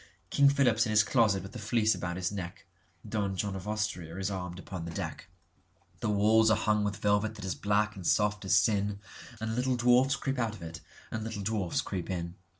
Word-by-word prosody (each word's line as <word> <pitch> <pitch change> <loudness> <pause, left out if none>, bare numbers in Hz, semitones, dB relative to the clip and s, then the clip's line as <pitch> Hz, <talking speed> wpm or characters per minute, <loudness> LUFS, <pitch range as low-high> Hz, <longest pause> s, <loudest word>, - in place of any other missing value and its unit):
King 140 0 +6
Philip's 120 -5 +3
in - - -3
his 110 0 +5
closet 105 -5 +2
with 100 - -9
the 120 - -8
Fleece 110 +1 +2
about 90 -1 -4
his 90 0 -2
neck(Don 95 +2 -6
John 100 +1 -2
of 95 +1 -7
Austria 95 -6 -3
is 95 +1 -2
armed 90 -2 -5
upon 95 -2 -7
the - - -5
deck.)The - - -8
walls 110 +2 +4
are 110 - +4
hung 105 -1 +1
with 105 0 -2
velvet 105 +2 +1
that 105 -3 -7
is 95 - -1
black 105 +1 0
and 95 -3 -5
soft 105 -1 +2
as 95 - +3
sin, 105 -2 +2 0.4
And 110 0 -2
little 125 +1 +1
dwarfs 125 +3 +4
creep 135 -3 -3
out 115 -2 -1
of 90 - -11
it 80 0 -7 0.3
and 110 - -3
little 110 -2 -5
dwarfs 100 -4 0
creep 95 -3 -5
in. 85 -2 -3
105 Hz, 205 wpm, -30 LUFS, 95-110 Hz, 0.4 s, King